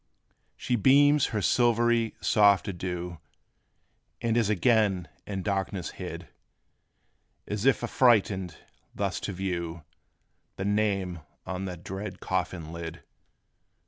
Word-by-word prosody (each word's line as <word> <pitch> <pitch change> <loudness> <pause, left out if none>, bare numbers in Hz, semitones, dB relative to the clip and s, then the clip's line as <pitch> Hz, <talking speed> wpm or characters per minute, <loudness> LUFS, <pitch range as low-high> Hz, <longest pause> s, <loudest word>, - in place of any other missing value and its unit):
She 125 - -1
beams 140 +5 +5
her 105 -3 -2
silvery, 120 -1 +2
soft 100 -1 +4
adieu. 90 -2 -4 1.0
And 115 -1 0
is 115 -3 +2
again 105 -3 +2 0.2
in 95 -2 -4
darkness 95 -2 -2
hid; - - -7 1.2
As 105 +4 -1
if 135 - +3
affrighted, 105 -8 +2 0.4
thus - - -1
to - - -4
view 85 -3 -4 0.7
The 95 - -4
name 100 -4 0 0.3
on 95 +1 -4
that 90 -2 -7
dread 95 +1 -6
coffin 80 -3 -3
lid. 80 -3 -7
100 Hz, 110 wpm, -28 LUFS, 90-115 Hz, 1.2 s, beams